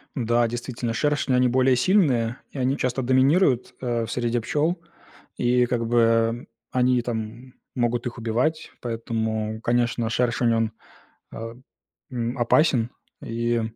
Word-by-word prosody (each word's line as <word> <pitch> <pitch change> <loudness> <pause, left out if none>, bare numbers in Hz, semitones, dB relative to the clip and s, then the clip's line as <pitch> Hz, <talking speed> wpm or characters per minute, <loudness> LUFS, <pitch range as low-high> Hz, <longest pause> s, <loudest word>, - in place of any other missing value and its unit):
Да, 120 -2 +2
действительно, 120 0 -4
шершни, 145 +1 0
они 125 0 +4
более 130 +1 +3
сильные, 125 - +2
и - - -10
они 130 +2 0
часто 125 +1 -1
доминируют, 130 +2 +3
а 120 -2 -1
в 115 - -7
среде 120 -1 0
пчёл, 150 +9 0 0.6
и 125 0 +3
как 120 -1 -1
бы, 120 0 +3
эм, 115 +1 +2 0.2
они 125 -1 +2
там 120 +2 -5 0.2
могут 120 -1 0
их 120 - -7
убивать. 120 +8 -1
Поэтому, 110 -2 -3
конечно, 120 -1 0
шершень, 120 0 +1
он, 115 -1 +1 0.6
а, 115 +1 -7 0.6
м, 120 0 -3
опасен, 120 -1 +3 0.3
и, 115 0 -1
120 Hz, 135 wpm, -24 LUFS, 115-130 Hz, 0.6 s, они